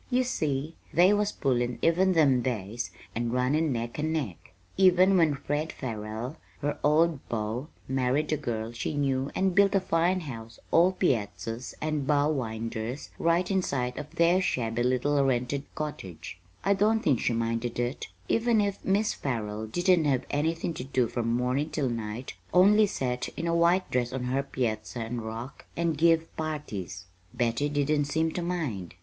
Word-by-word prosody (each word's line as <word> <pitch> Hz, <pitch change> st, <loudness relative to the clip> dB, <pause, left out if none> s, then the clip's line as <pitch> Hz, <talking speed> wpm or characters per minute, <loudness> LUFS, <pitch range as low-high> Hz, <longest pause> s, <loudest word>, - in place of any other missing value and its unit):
You 255 Hz, 0 st, +3 dB
see, 155 Hz, -, -2 dB, 0.2 s
they 180 Hz, +4 st, +5 dB
was 210 Hz, 0 st, +1 dB
pullin' 120 Hz, -3 st, 0 dB
even 185 Hz, +3 st, +4 dB
them 140 Hz, -7 st, +4 dB
days 115 Hz, -1 st, -3 dB, 0.2 s
and 120 Hz, +1 st, -1 dB
runnin' 140 Hz, +5 st, +1 dB
neck 120 Hz, +2 st, -3 dB
and 155 Hz, +1 st, 0 dB
neck. 135 Hz, -, -4 dB, 0.2 s
Even 185 Hz, 0 st, +5 dB
when 160 Hz, -5 st, +4 dB
Fred 145 Hz, +3 st, -2 dB
Farrell, 115 Hz, +3 st, -5 dB, 0.2 s
her 145 Hz, 0 st, -2 dB
old 155 Hz, +1 st, +3 dB
beau, 115 Hz, +4 st, -2 dB, 0.2 s
married 135 Hz, +4 st, +1 dB
a -, -, +1 dB
girl 115 Hz, -5 st, -3 dB
she 120 Hz, +5 st, -3 dB
knew 135 Hz, -1 st, 0 dB
and 190 Hz, -1 st, +2 dB
built 200 Hz, +1 st, +4 dB
a -, -, +5 dB
fine 180 Hz, 0 st, +1 dB
house 115 Hz, -7 st, -8 dB
all 175 Hz, +3 st, +5 dB
piazzas 115 Hz, -, -2 dB
and 155 Hz, -3 st, -1 dB
bow 145 Hz, 0 st, +3 dB
winders 115 Hz, -1 st, -4 dB
right 170 Hz, +3 st, +2 dB
in 190 Hz, -1 st, +2 dB
sight 125 Hz, -6 st, -2 dB
of 150 Hz, +2 st, -9 dB
their 170 Hz, +2 st, +4 dB
shabby 120 Hz, -9 st, -1 dB
little 130 Hz, +3 st, +2 dB
rented 135 Hz, +2 st, 0 dB
cottage, 95 Hz, -, -6 dB, 0.3 s
I 200 Hz, -, +5 dB
don't 215 Hz, +3 st, +2 dB
think 140 Hz, -, +2 dB
she 120 Hz, -, 0 dB
minded 115 Hz, +1 st, -1 dB
it; 120 Hz, +3 st, -2 dB, 0.2 s
even 230 Hz, -1 st, +2 dB
if 200 Hz, -1 st, -1 dB
Mis' 205 Hz, +3 st, +2 dB
Farrell 110 Hz, -4 st, -3 dB
didn't 175 Hz, -, +2 dB
have 135 Hz, -4 st, +1 dB
anythin' 165 Hz, +3 st, 0 dB
to 125 Hz, -, -5 dB
do 130 Hz, -2 st, +1 dB
from 115 Hz, -1 st, -1 dB
mornin' 125 Hz, +5 st, 0 dB
till 140 Hz, -5 st, -1 dB
night 115 Hz, +1 st, -4 dB, 0.2 s
only 205 Hz, +4 st, +6 dB
set 125 Hz, -8 st, -2 dB
in 165 Hz, -, -2 dB
a 170 Hz, -, +1 dB
white 170 Hz, +2 st, +3 dB
dress 125 Hz, -1 st, 0 dB
on 130 Hz, -1 st, -3 dB
her 130 Hz, +2 st, 0 dB
piazza, 120 Hz, -4 st, -3 dB
and 115 Hz, +1 st, -3 dB
rock, 115 Hz, +4 st, -7 dB
and 170 Hz, -1 st, +1 dB
give 165 Hz, +1 st, +2 dB
parties, 105 Hz, -, -5 dB, 0.3 s
Betty 120 Hz, +4 st, 0 dB
didn't 145 Hz, 0 st, +1 dB
seem 160 Hz, +3 st, 0 dB
to 175 Hz, -, -3 dB
mind. 145 Hz, -, -3 dB
140 Hz, 170 wpm, -28 LUFS, 120-165 Hz, 0.3 s, only